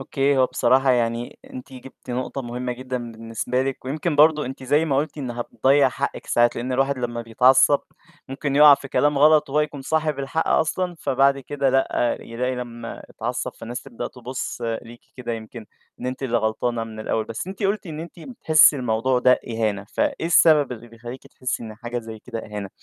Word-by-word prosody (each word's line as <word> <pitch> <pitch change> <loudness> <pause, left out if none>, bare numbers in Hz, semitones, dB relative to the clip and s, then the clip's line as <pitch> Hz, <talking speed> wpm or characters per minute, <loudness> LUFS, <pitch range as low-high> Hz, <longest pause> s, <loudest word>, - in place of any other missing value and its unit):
أوكي. 135 +1 0
هو 130 - +5
بصراحة 135 +1 +3
يعني 120 -1 -1
أنتِ 130 +1 -9
جِبتِ 130 0 -12
نقطة 130 +2 -3
مهمة 125 +1 -4
جدًا 125 -2 -5
بالنسبة 115 +3 -2
لِك 135 -1 -4
ويمكن 150 +3 -2
برضو 150 0 +5
أنتِ 130 +1 -7
زي 145 +5 +2
ما 140 -4 0
قُلتِ 150 +2 -2
إن 130 -4 -4
هتضيَّع 135 +3 +2
حقِك 140 +2 -4
ساعات، 120 0 +3
لأن 125 +2 -3
الواحد 135 +1 +1
لمّا 120 -1 -3
بيتعصّب 130 +5 +4 0.5
ممكن 140 +1 -3
يُقع 150 -1 +9
في 135 - -10
كلام 145 +1 +2
غلط 150 0 +5
وهو 150 +2 +2
يكون 145 -2 -3
صاحب 155 0 0
الحق 140 +4 -2
أصلًا 175 +3 +1
فبعد 140 +1 +2
كده 135 0 -1
لأ، 130 -2 +1
يلاقي 125 +3 -3
لمّا 120 -1 -7
اتعصّب 120 +2 -3
فالناس 120 +2 -7
تبدأ 115 - -6
تبُص 125 0 -6 0.2
ليكِ 120 0 -13 0.2
كده 120 -2 -4
يمكن 110 0 -8 0.3
إن - - -4
أنتِ 130 +1 -4
اللي 120 -3 0
غلطانة 115 +1 -1
من 110 -1 -9
الأول. 110 0 -1
بس 115 +11 -6
أنتِ 195 +2 -7
قُلتِ 200 0 0
إن 155 -2 -6
أنتِ 170 +1 -10
بتحسّي 160 - +4
الموضوع 125 +1 +1
ده 125 0 +4
إهانة، 110 -3 -1
فإيه 165 - 0
السبب 155 -5 +5
اللي 120 0 -10
بيخلّيكِ 120 +2 -10
تحسّي 125 -2 -4
إن 110 -1 -8
حاجة 120 +2 -5
زي 110 -1 -8
كده 115 - -7
إهانة؟ 105 -3 -6
130 Hz, 190 wpm, -23 LUFS, 120-140 Hz, 0.5 s, يُقع